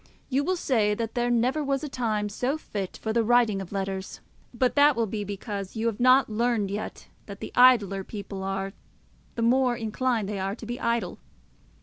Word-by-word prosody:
You 275 +1 +1
will 370 +5 0
say 220 -11 +1
that 225 0 -3
there 240 0 0
never 250 +6 +1
was 275 0 -1
a - - -2
time 220 -6 -1
so 250 +8 -1
fit 200 -10 -5
for 220 - -3
the 230 0 +2
writing 230 -3 +3
of 190 - -9
letters, 195 -1 -4 0.3
but 250 +1 +1
that 290 0 +5
will 230 0 +1
be 210 0 -4
because 200 0 -5
you 220 +1 -2
have 230 -3 -1
not 255 +2 +5
learned 220 -2 0
yet 210 +2 -5 0.2
that 200 -1 -8
the - - -7
idler 210 -6 +5
people 200 -1 -7
are, 195 0 -3 0.6
the 230 - -1
more 250 +1 +3
inclined 225 -1 -1
they 205 -1 -3
are 195 +1 -2
to 230 - -10
be 240 +2 -5
idle. 235 0 -1
225 Hz, 200 wpm, -26 LUFS, 200-250 Hz, 0.6 s, that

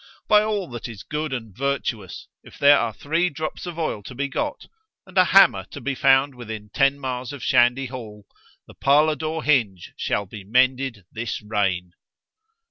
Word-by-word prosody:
By 210 0 +6
all 210 -3 -1
that 120 -1 -6
is 115 -4 -9
good 150 -1 -4
and 115 -7 -6
virtuous, 125 -7 -3
if - - -16
there 145 0 +6
are 115 -1 -1
three 165 +10 0
drops 155 +3 -5
of 170 -2 -6
oil 155 -10 -2
to 125 +5 -10
be 140 +2 -1
got, 295 - -3 0.4
and 190 - -17
a 185 -1 +6
hammer 195 +3 +6
to 145 - -10
be 140 +1 -2
found 135 +1 +3
within 110 -4 -8
ten 135 0 +2
miles 130 -1 -4
of 140 -5 -8
Shandy 120 +3 +3
Hall——the 110 -5 -12
parlour 150 +3 +3
door 155 +2 -4
hinge 110 - +1
shall 100 - -1
be 100 +1 -10
mended 125 -1 +1
this 115 -1 -4
reign. 95 -4 -1
130 Hz, 175 wpm, -23 LUFS, 110-150 Hz, 0.4 s, By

